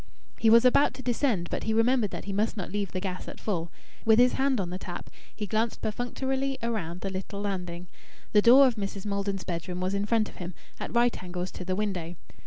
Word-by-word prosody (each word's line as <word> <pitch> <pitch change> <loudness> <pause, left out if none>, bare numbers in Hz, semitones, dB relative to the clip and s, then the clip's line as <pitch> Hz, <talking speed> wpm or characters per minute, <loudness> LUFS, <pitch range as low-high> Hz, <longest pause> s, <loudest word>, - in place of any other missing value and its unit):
He 225 - +5
was 230 +2 +7
about 255 +2 +5
to 260 - -8
descend, 240 -7 +1
but - - -2
he 220 - +1
remembered 230 -1 +3
that - - -6
he 200 - -3
must 215 +3 0
not 190 - -4
leave 200 -2 -2
the 185 - -2
gas 185 -1 -5
at - - -8
full. 175 -5 -2 0.3
With 220 -1 +5
his 250 +1 +5
hand 270 -3 +1
on 180 -3 -2
the 185 - -4
tap, 175 -2 -7 0.2
he 210 - -3
glanced 220 +2 -1
perfunctorily 265 +4 -2
around 180 -7 -2
the 195 - -3
little 195 +1 -5
landing. 180 -4 -4 0.5
The 210 - +6
door 255 +5 +8
of 245 -3 +1
Mrs. 195 -1 -4
Maldon's 200 -1 -2
bedroom 180 0 -4
was 185 +1 -1
in 200 +1 -1
front 220 -1 +2
of - - -13
him, 175 -1 -6 0.2
at - - -5
right 240 0 +2
angles 180 0 -4
to 180 - -7
the 185 0 -1
window. 185 -5 -2
205 Hz, 225 wpm, -28 LUFS, 185-235 Hz, 0.5 s, door